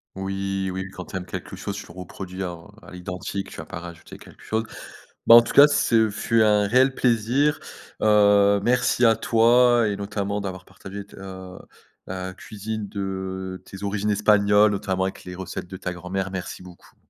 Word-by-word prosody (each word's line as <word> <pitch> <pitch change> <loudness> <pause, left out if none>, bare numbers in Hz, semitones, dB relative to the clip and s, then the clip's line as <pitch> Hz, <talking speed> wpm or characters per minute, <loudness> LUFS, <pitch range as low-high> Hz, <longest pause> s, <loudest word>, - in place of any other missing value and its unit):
Oui, 95 0 -3
oui, 95 0 -5
quand 90 -1 -9
tu - - -10
aimes 90 - -4
quelque - - -7
chose, 100 0 -5
tu 100 - -7
le - - -14
reproduis 95 +1 -7
en 85 0 -7
à - - -14
l'identique. 90 +2 -5
Tu - - -11
vas 80 - -7
pas 85 - -7
rajouter 85 -1 -11
quelque - - -16
chose. 110 +1 -2 0.6
Bah, 115 - +10
en 120 - +10
tout - - -5
cas, 145 +1 +9
ce 115 -6 +2
fut 115 +2 +1
un 105 -1 +4
réel 130 +4 +3
plaisir. 125 +5 +1 0.4
Heu, 100 -1 +5
merci 125 +1 +2
à 115 -1 +5
toi 120 +1 +4
et 100 - -1
notamment 100 0 -3
d'avoir 95 -2 -6
partagé 95 +1 -9
tes, - - -17
heu, 95 -1 -9 0.5
la 95 0 -5
cuisine 105 +2 -6
de 95 -1 -5
tes 95 +1 -10
origines 100 +1 -1
espagnoles, 105 0 +4
notamment 95 -2 -1
avec 95 - -5
les 90 0 -7
recettes 95 -1 -6
de 95 - -8
ta 90 -1 -4
grand-mère. 95 +2 -4
Merci 90 -1 -6
beaucoup. 90 -1 -16
100 Hz, 185 wpm, -24 LUFS, 95-110 Hz, 0.6 s, Bah